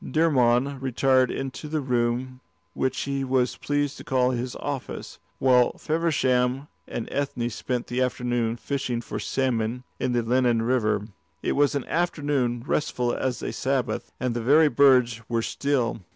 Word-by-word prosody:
Dermod 135 Hz, -4 st, +2 dB
retired 130 Hz, 0 st, +3 dB
into 135 Hz, +3 st, -5 dB
the 155 Hz, +1 st, -1 dB
room 125 Hz, -1 st, -1 dB, 0.3 s
which 130 Hz, 0 st, -1 dB
he 140 Hz, -1 st, -2 dB
was 130 Hz, -1 st, +1 dB
pleased 145 Hz, 0 st, -1 dB
to -, -, -9 dB
call 130 Hz, -1 st, +2 dB
his 125 Hz, 0 st, -3 dB
office, 140 Hz, -3 st, -5 dB, 0.2 s
while 125 Hz, -2 st, +3 dB
Feversham 135 Hz, -5 st, +1 dB, 0.2 s
and 115 Hz, -, -4 dB
Ethne 125 Hz, -4 st, -2 dB
spent 125 Hz, +1 st, -3 dB
the 125 Hz, +1 st, -2 dB
afternoon 120 Hz, -2 st, 0 dB
fishing 130 Hz, -2 st, -2 dB
for -, -, -5 dB
salmon 125 Hz, -2 st, -1 dB, 0.2 s
in 125 Hz, -, 0 dB
the 120 Hz, -1 st, +1 dB
Lennon 120 Hz, -1 st, +2 dB
River. 110 Hz, -4 st, +1 dB, 0.4 s
It -, -, 0 dB
was 145 Hz, 0 st, +2 dB
an 140 Hz, -, -2 dB
afternoon 145 Hz, -8 st, 0 dB
restful 125 Hz, -5 st, 0 dB
as 130 Hz, -2 st, -2 dB
a -, -, -3 dB
Sabbath, 135 Hz, -1 st, -1 dB
and 125 Hz, -1 st, -1 dB
the 120 Hz, -, -1 dB
very 150 Hz, +6 st, +5 dB
birds 125 Hz, -5 st, +4 dB
were 115 Hz, -1 st, 0 dB
still. 130 Hz, -6 st, -1 dB
130 Hz, 150 wpm, -25 LUFS, 120-140 Hz, 0.4 s, very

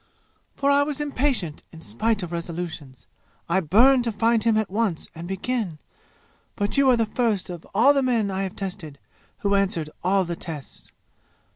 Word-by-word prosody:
For 280 Hz, 0 st, +2 dB
I 280 Hz, 0 st, +5 dB
was 285 Hz, 0 st, -2 dB
impatient 270 Hz, -, -1 dB
in 160 Hz, -, -12 dB
spite 205 Hz, -, -1 dB
of 175 Hz, -, -6 dB
resolutions. 165 Hz, -5 st, -6 dB, 0.4 s
I 170 Hz, +3 st, +2 dB
burned 240 Hz, -, +5 dB
to 230 Hz, -, 0 dB
find 225 Hz, +1 st, +2 dB
him 225 Hz, -1 st, +3 dB
at 215 Hz, -3 st, -1 dB
once, 205 Hz, -5 st, -1 dB
and 170 Hz, +1 st, -8 dB
begin! 195 Hz, -2 st, -2 dB, 0.8 s
But 205 Hz, -1 st, -1 dB
you 275 Hz, -1 st, +5 dB
are 250 Hz, -, +5 dB
the 225 Hz, -, +2 dB
first 215 Hz, -4 st, -1 dB
of 175 Hz, -2 st, -9 dB
all 255 Hz, +7 st, +6 dB
the 275 Hz, -, +2 dB
men 235 Hz, -6 st, +1 dB
I 190 Hz, 0 st, -2 dB
have 190 Hz, -2 st, -4 dB
tested 185 Hz, -7 st, -6 dB, 0.4 s
who 200 Hz, 0 st, +1 dB
answered 185 Hz, -6 st, 0 dB
all 190 Hz, +1 st, +2 dB
the 170 Hz, 0 st, -3 dB
tests! 160 Hz, -5 st, -9 dB
200 Hz, 175 wpm, -24 LUFS, 170-235 Hz, 0.8 s, all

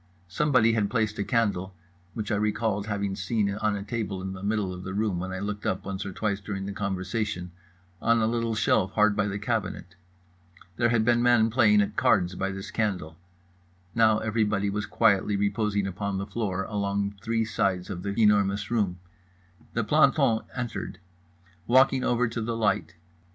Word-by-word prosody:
Somebody 115 Hz, +3 st, +3 dB
had 105 Hz, -3 st, +1 dB
placed 110 Hz, -3 st, -1 dB
a -, -, +1 dB
candle 100 Hz, -6 st, 0 dB, 0.4 s
(which 110 Hz, -1 st, -3 dB
I -, -, +2 dB
recalled 105 Hz, 0 st, -1 dB
having 100 Hz, -2 st, -2 dB
seen 100 Hz, +1 st, -1 dB
on 105 Hz, 0 st, 0 dB
a 100 Hz, -, -4 dB
table 105 Hz, -3 st, -3 dB
in 95 Hz, 0 st, -5 dB
the 95 Hz, -, -8 dB
middle 100 Hz, -2 st, -1 dB
of 90 Hz, 0 st, -8 dB
the 95 Hz, +1 st, -5 dB
room 105 Hz, -4 st, 0 dB
when 95 Hz, +1 st, -4 dB
I 95 Hz, -, -4 dB
looked 105 Hz, +1 st, -4 dB
up 95 Hz, -, -2 dB
once 95 Hz, 0 st, -4 dB
or -, -, -5 dB
twice 100 Hz, 0 st, -2 dB
during 100 Hz, -1 st, -5 dB
the 100 Hz, -, -4 dB
conversation) 95 Hz, -1 st, -3 dB, 0.5 s
on 115 Hz, 0 st, +3 dB
a 110 Hz, -, +2 dB
little 115 Hz, 0 st, 0 dB
shelf 100 Hz, -3 st, +2 dB
hard 105 Hz, -1 st, +3 dB
by 105 Hz, 0 st, +1 dB
the 100 Hz, 0 st, -3 dB
cabinet. 105 Hz, -5 st, -3 dB, 0.8 s
There 120 Hz, -1 st, +3 dB
had 115 Hz, -2 st, +2 dB
been 120 Hz, 0 st, +3 dB
men 120 Hz, -2 st, +4 dB
playing 105 Hz, -4 st, +5 dB
at 100 Hz, -, -3 dB
cards 90 Hz, 0 st, +3 dB
by 95 Hz, +2 st, -2 dB
this 95 Hz, 0 st, -6 dB
candle—now 90 Hz, +2 st, -2 dB
everybody 105 Hz, -2 st, 0 dB
was 105 Hz, +1 st, -3 dB
quietly 105 Hz, -2 st, +2 dB
reposing 100 Hz, 0 st, 0 dB
upon 95 Hz, +1 st, -3 dB
the 95 Hz, -, -3 dB
floor 100 Hz, -3 st, -2 dB
along 100 Hz, 0 st, -2 dB
three 115 Hz, +1 st, 0 dB
sides 95 Hz, -4 st, -1 dB
of 90 Hz, -2 st, -5 dB
The 100 Hz, +2 st, -3 dB
Enormous 100 Hz, -2 st, +3 dB
Room. 100 Hz, -6 st, 0 dB, 0.8 s
The -, -, +1 dB
planton 110 Hz, -1 st, +3 dB, 0.2 s
entered. 120 Hz, -6 st, -4 dB, 0.7 s
Walked 130 Hz, +3 st, +5 dB
over 125 Hz, -2 st, +1 dB
to 115 Hz, 0 st, -4 dB
the 115 Hz, +1 st, -2 dB
light. 105 Hz, -5 st, 0 dB
105 Hz, 175 wpm, -27 LUFS, 95-110 Hz, 0.8 s, playing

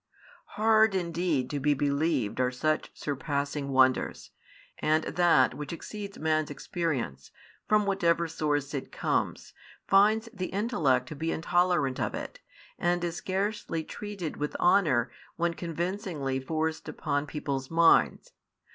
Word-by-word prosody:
Hard 220 Hz, -1 st, +4 dB
indeed 170 Hz, -6 st, 0 dB
to 145 Hz, -, -2 dB
be 145 Hz, +1 st, +2 dB
believed 140 Hz, -5 st, 0 dB
are 125 Hz, 0 st, +3 dB
such 155 Hz, +5 st, -1 dB
surpassing 140 Hz, 0 st, -3 dB
wonders, 130 Hz, -1 st, +2 dB, 0.5 s
and 155 Hz, +1 st, +2 dB
that 170 Hz, -6 st, +3 dB
[which 150 Hz, +2 st, -6 dB
exceeds 200 Hz, +4 st, -7 dB
man's 155 Hz, -1 st, 0 dB
experience], 145 Hz, -, -3 dB, 0.4 s
from 210 Hz, -1 st, +3 dB
whatever 170 Hz, -4 st, +2 dB
source 145 Hz, -3 st, -1 dB
it 140 Hz, -, -4 dB
comes, -, -, -2 dB, 0.3 s
finds 215 Hz, +3 st, +4 dB
the 185 Hz, -3 st, -3 dB
intellect 155 Hz, -, +1 dB
to -, -, -6 dB
be 160 Hz, +3 st, -2 dB
intolerant 175 Hz, -5 st, +1 dB
of -, -, -1 dB
it, -, -, -7 dB, 0.4 s
and 175 Hz, 0 st, +1 dB
is 170 Hz, 0 st, -2 dB
scarcely 190 Hz, -3 st, -2 dB
treated 200 Hz, -4 st, -6 dB
with 150 Hz, 0 st, -3 dB
honour 155 Hz, -10 st, +3 dB, 0.2 s
when 170 Hz, 0 st, 0 dB
convincingly 170 Hz, -5 st, -3 dB
forced 160 Hz, +3 st, -2 dB
upon 145 Hz, -1 st, -2 dB
people's 135 Hz, -2 st, -3 dB
minds. 165 Hz, 0 st, +4 dB
160 Hz, 130 wpm, -28 LUFS, 140-180 Hz, 0.5 s, Hard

